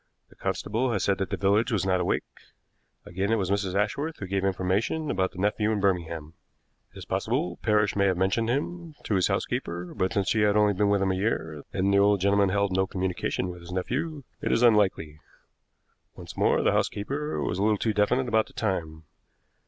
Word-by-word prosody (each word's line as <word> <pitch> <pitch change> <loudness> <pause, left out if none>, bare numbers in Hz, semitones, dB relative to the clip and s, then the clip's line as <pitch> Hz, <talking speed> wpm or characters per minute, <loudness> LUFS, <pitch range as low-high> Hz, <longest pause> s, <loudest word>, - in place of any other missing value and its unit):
The - - -20
constable 120 +5 -1
had 100 -4 -1
said 100 0 +1
that 95 - -2
the 100 - -2
village 105 +6 +2
was 105 -4 0
not 95 -1 +2
awake. 90 - 0 0.8
Again, 95 +4 -2
it - - +4
was 95 -3 -1
Mrs. 100 -2 -1
Ashworth 140 +11 -1
who 100 - -6
gave 95 0 -1
information 100 - 0
about 95 -4 0
the - - -15
nephew 105 +2 +1
in 105 - 0
Birmingham. 85 -5 -1 0.6
It - - -16
is - - -8
possible 90 -1 -1
Parrish 105 -2 +2
may 100 -1 +3
have 95 -2 +1
mentioned 95 +5 +1
him 160 +5 -3
to - - -2
his 95 -3 +3
housekeeper, 85 +1 -3
but, 95 - -1
since 100 -2 0
she 110 - +2
had 105 0 +3
only 105 -1 +4
been 100 +2 +1
with 100 -1 +2
him 95 - +1
a - - 0
year, 80 -7 -2
and 95 +1 +1
the 100 - +5
old 100 0 +4
gentleman 100 +1 +3
held 100 +1 +1
no 95 0 +2
communication 95 -1 -2
with 90 -1 -8
his 85 +1 -11
nephew, 140 - -3 0.2
it - - -1
is 120 - +2
unlikely. 95 -9 +3 1.0
Once - - -10
more, - - +2
the - - +3
housekeeper 145 +9 -2
was 90 - -2
a - - 0
little 105 0 +3
too 110 +1 0
definite 125 +5 +1
about 110 -2 +2
the - - -18
time. 80 -7 -3
100 Hz, 210 wpm, -27 LUFS, 95-110 Hz, 1.0 s, the